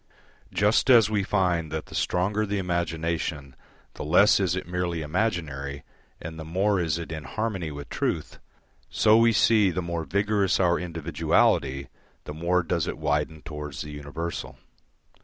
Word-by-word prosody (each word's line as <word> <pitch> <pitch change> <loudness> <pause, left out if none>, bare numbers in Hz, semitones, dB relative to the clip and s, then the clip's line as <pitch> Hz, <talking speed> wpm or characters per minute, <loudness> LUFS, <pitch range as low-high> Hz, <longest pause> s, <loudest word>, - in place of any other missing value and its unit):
Just 105 +6 +2
as 115 -4 +6
we 105 -2 +2
find 90 -5 0
that 80 0 -3
the - - -14
stronger 100 +4 0
the 100 +1 -1
imagination 85 -5 -2 0.4
the - - -7
less 90 +8 +5
is 90 -3 +1
it 95 - -4
merely 90 -2 -2
imaginary 75 -6 -2 0.4
and 80 0 -8
the - - -5
more 95 +5 +1
is 80 -2 0
it 85 -1 -6
in 80 -1 -5
harmony 105 -6 -3
with 70 -1 -8
truth, - - -3 0.5
so 110 - +4
we 115 0 +5
see 110 -3 +4
the 90 - -2
more 85 -2 -3
vigorous 100 +4 +1
our 85 -2 +3
individuality 80 -5 +1 0.4
the 75 - -7
more 85 +3 +1
does 85 -1 -1
it - - -4
widen 75 0 -1
towards 75 -2 -6
the 75 - -8
universal. 75 +4 -6
85 Hz, 160 wpm, -26 LUFS, 75-95 Hz, 0.5 s, as